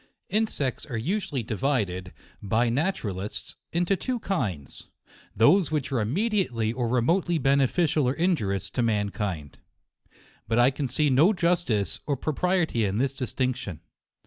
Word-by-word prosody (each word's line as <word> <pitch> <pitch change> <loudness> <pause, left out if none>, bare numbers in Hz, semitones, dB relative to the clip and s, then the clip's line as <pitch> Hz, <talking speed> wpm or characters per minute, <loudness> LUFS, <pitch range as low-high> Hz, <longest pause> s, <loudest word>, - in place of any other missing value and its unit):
Insects 210 - 0
are 120 -5 -3
usually 165 - -2
divided, 105 -6 -1 0.3
by 115 +4 +1
naturalists, 105 - -3 0.2
into 175 +3 +1
two 250 +7 -2
kinds: 110 - -3 0.5
those 160 - +5
which 150 -3 -2
are 130 - +1
immediately 130 - 0
or 120 -1 -1
remotely 165 +9 +2
beneficial 140 +1 +2
or 130 - -1
injurious 100 - 0
to 125 - -1
man 105 -3 +1
kind. 90 - -4 0.9
But 115 - +1
I 120 +2 +5
can 140 0 -3
see 145 +4 +1
no 155 +11 +5
justice 170 - +1
or 140 -2 0
propriety 160 -3 0
in 100 0 0
this 135 +2 +1
distinction. 125 - -3
130 Hz, 135 wpm, -26 LUFS, 110-170 Hz, 0.9 s, those